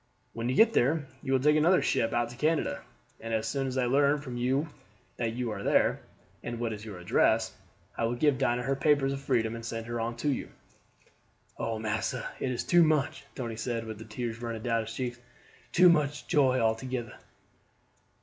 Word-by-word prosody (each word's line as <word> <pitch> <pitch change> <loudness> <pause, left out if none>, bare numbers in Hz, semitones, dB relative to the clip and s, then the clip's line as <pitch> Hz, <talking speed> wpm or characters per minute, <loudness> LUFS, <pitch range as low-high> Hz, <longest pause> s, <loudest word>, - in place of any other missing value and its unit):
"When 115 +1 -3
you 130 - 0
get 225 +5 +6
there 145 +4 +2 0.2
you 135 - -4
will 135 - +4
take 150 +3 +4
another 175 +4 +4
ship 115 0 +1
out 120 0 0
to - - -10
Canada, 155 +4 0 0.4
and 115 0 -3
as 110 0 -1
soon 135 +2 -1
as 130 0 -3
I 130 - +2
learn 140 +3 +3
from 130 -4 -7
you 130 +5 0 0.5
that 115 -2 -1
you 120 -1 -2
are - - -5
there, - - +2 0.4
and 120 -1 -5
what 115 -2 -1
is 105 0 -8
your 105 -4 -8
address, 90 - +2 0.4
I 115 - 0
will 115 +2 -1
give 140 +1 +2
Dinah 120 +1 +1
her 135 +2 0
papers 140 -1 +2
of 135 - -5
freedom 115 -5 0
and 115 0 -7
send 115 -1 -4
her 120 0 -4
on 115 +1 -3
to 145 +5 -1
you." 135 - -2 1.1
"Oh, 115 -1 -3
massa, 110 -1 -2
it 130 - -1
is 125 - -2
too 175 -1 +5
much," 155 -3 +1
Tony 115 -4 -4
said, 115 0 -3
with 110 -2 -7
the 110 - -9
tears 115 +1 -5
running 115 -2 -4
down 115 -2 +1
his - - -7
cheeks; 120 -1 -3 0.5
"too 180 +1 +6
much 150 -4 +2
joy 135 -6 +3
altogeder." 115 +1 -2
120 Hz, 205 wpm, -29 LUFS, 115-140 Hz, 1.1 s, get